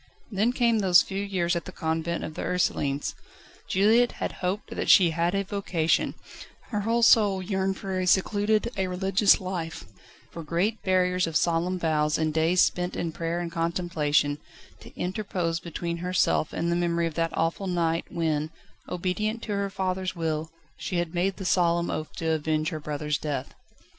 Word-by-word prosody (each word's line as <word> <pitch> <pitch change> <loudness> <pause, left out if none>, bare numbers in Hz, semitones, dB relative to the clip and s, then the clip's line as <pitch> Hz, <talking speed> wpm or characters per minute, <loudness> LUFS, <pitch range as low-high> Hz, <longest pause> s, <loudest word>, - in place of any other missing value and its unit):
Then 210 +4 +2
came 235 -3 +2
those 180 -4 +6
few 195 +1 -4
years 185 -3 0
at 170 - -3
the - - -7
Convent 160 +1 -2
of 155 - -5
the 170 - -6
Ursulines. 145 -6 0 0.5
Juliette 225 +5 +3
had - - -3
hoped 185 +3 -2
that - - -2
she 175 -4 +7
had 170 +3 0
a 195 - +1
vocation; 185 -5 0 0.6
her 210 - 0
whole 230 +3 +1
soul 205 -4 +5
yearned 190 0 -1
for 190 -1 -3
a 185 - -1
secluded, 210 +4 +2
a 190 -1 0
religious, 190 +2 +3
life, 180 -3 -5 0.5
for 170 - -7
great 175 +8 -1
barriers 180 -1 +2
of 165 - -6
solemn 170 +3 +1
vows 155 -2 +1
and 155 -1 0
days 165 +3 +3
spent 180 0 +1
in 165 - -2
prayer 165 +1 -3
and 170 -1 -4
contemplation, 165 -4 0 0.4
to - - -13
interpose 180 -3 -2
between 170 0 -4
herself 180 -3 +1
and 170 +1 -1
the - - +2
memory 170 -1 +1
of 165 - -3
that 165 +1 -2
awful 165 +4 0
night 170 -2 0
when, 160 -3 -1 0.4
obedient 210 +6 -2
to 215 - -5
her 200 -1 -1
father's 190 -1 -2
will, 160 -1 -2 0.3
she 160 +3 -4
had 175 -1 -2
made 185 +2 0
the 190 - -6
solemn 170 -1 +2
oath 155 0 -4
to 160 -1 -1
avenge 155 0 0
her 155 -3 -5
brother's 150 0 -2
death. 140 -4 -4
175 Hz, 175 wpm, -26 LUFS, 165-190 Hz, 0.6 s, she